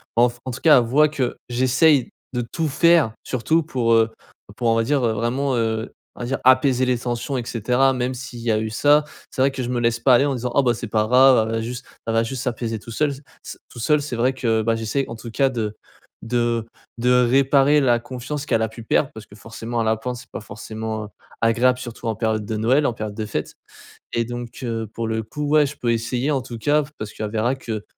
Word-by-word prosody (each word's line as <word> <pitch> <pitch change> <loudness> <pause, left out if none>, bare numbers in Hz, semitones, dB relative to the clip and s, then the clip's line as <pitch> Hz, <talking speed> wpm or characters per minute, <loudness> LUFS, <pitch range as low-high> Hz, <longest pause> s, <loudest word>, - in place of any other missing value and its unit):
enf 120 +1 +3
en 130 - -3
tout 125 - -7
cas 155 -3 +7
elle 125 - +4
voit 150 +6 +4
que 135 -5 -2
j'essaye 130 +3 +3 0.2
de 125 - -1
tout 160 +7 -3
faire 160 -4 +4
surtout 160 +6 0
pour, 125 -7 0
heu 115 0 +3 0.4
pour 120 - -1
on 115 - +3
va 115 - +2
dire 140 +3 +1
vraiment, 120 +4 0
heu, 110 0 -1 0.2
on - - -15
va - - -3
dire 135 - -1
apaiser 130 0 +4
les 125 -1 +1
tensions 120 +3 -3
et 125 - -2
cetera. 125 +3 +1
Même 125 0 -1
s'il 125 -1 -8
y 115 -1 0
a 110 - +2
eu 110 0 -3
ça, 145 +6 +4 0.3
c'est - - -2
vrai 135 - +5
que 135 -1 -4
je 120 - -4
me 125 -1 -1
laisse 115 0 +1
pas 125 +2 +4
aller 125 +3 +5
en 140 -2 0
disant: 125 0 -3
«Ah 140 - +5
bah, 125 -3 +2
c'est 115 - -6
pas 110 0 +1
grave 125 -2 +5
elle 115 - -1
a 115 - -1
juste 125 +3 -5 0.2
elle 115 - -1
va 115 - +3
juste 125 +2 -4
s'apaiser 115 -2 -2
tout 115 - -11
seul, 150 +5 +1
c 135 - -11 0.2
c - - -8
tout - - -11
seul. 150 +5 +2
C'est 140 -4 -4
vrai 125 +3 +1
que 115 -3 +1
bah, 115 +1 +1
j'essaye 115 +5 -1
en 115 - -6
tout 115 0 -9
cas 135 +4 +2
de 110 -4 -3 0.5
de 120 -1 0 0.3
de 125 +1 +2 0.2
réparer 140 +2 +4
la 120 -3 +3
confiance 130 +4 -6
qu'elle 115 - +1
a 110 - +1
pu 110 +1 -11
perdre 130 +5 +1
parce 110 -1 -10
que 105 - -16
forcément 115 +2 -5
l'apprendre 110 +3 -1
c'est - - -13
pas - - -5
forcément, 110 +1 -6
heu, - - -9 0.3
agréable 120 +3 +3
surtout 120 -2 -8
en 110 - -1
période 110 -1 -1
de 110 +1 -3
Noël, 130 +7 +2
en 120 - +1
période 110 -2 -6
de 110 0 -3
fêtes 105 - -4 0.6
et 115 - 0
donc 120 0 -7
heu, 115 -2 -3
pour 115 -1 -3
le 110 0 -1
coup 150 +7 -5
ouais, 150 0 +5
je 140 +1 -7
peux 120 -1 +1
essayer 120 +4 -1
en 135 -3 0
tout 120 -1 -8
cas 145 +7 +2
v 145 - -10
parce 110 -1 -6
qu'elle 105 -1 -4
verra 115 +4 0
que, 110 -5 -5
120 Hz, 250 wpm, -22 LUFS, 115-135 Hz, 0.6 s, cas